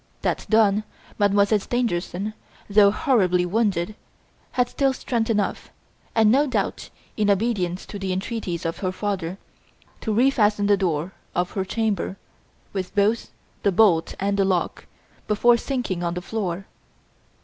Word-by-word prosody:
That - - -1
done, 215 -1 +4 0.4
Mademoiselle 205 +1 +4
Stangerson, 205 -3 -2 0.3
though 200 0 +6
horribly 200 - +2
wounded, 200 -1 0 0.6
had 250 -1 +2
still 270 +1 +1
strength 235 -3 -2
enough, 210 -3 -1 0.5
and 220 -2 +5
no 285 +4 +4
doubt 255 - -2 0.3
in 210 -2 +2
obedience 195 -4 0
to 205 - -7
the 190 -1 -2
entreaties 185 -3 -3
of 165 - -2
her 185 -2 -1
father, 185 -2 -3 0.6
to 220 - -3
refasten 215 -3 +3
the 205 0 +5
door 175 -2 -1 0.2
of 175 +1 0
her 190 - -1
chamber, 200 -2 -1 0.6
with 190 -2 -4
both 210 +3 +2 0.3
the 200 - +2
bolt 180 -4 +3
and 200 +1 0
the 200 - +4
lock, 185 -2 -1 0.4
before 235 +3 +4
sinking 235 -8 -2
on 170 0 -1
the 180 - -3
floor. 195 -3 -3
200 Hz, 140 wpm, -23 LUFS, 185-225 Hz, 0.6 s, though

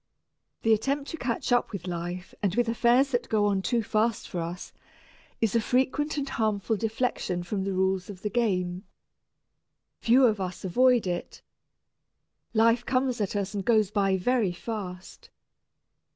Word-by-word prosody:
The 225 - +5
attempt 275 +6 -1
to 325 - -5
catch 245 -2 -2
up 245 0 +2
with 195 -5 -6
life 175 +1 -5
and 195 -2 0
with 240 -1 +2
affairs 240 +4 +3
that 245 -1 -1
go 210 -2 +2
on 200 -2 +1
too 235 +3 0
fast 220 +2 0
for 180 - -4
us 170 +2 -6 0.7
is 225 -1 +1
a 230 - +4
frequent 265 +6 0
and 280 -1 -2
harmful 220 -3 0
deflection 220 -5 -2
from 190 +2 -3
the 195 - -1
rules 190 0 0
of 190 -2 -9
the 210 - -1
game. 185 -5 0 1.1
Few 255 +3 +5
of 215 -4 +2
us 185 0 -5
avoid 245 +5 +4
it. 175 -1 -4 1.1
Life 230 +1 +3
comes 255 -2 0
at 205 0 -2
us 200 -1 -2
and 200 -1 -3
goes 215 -3 +3
by 195 -2 +2
very 215 -1 +1
fast. 185 -2 -7
215 Hz, 160 wpm, -27 LUFS, 190-240 Hz, 1.1 s, The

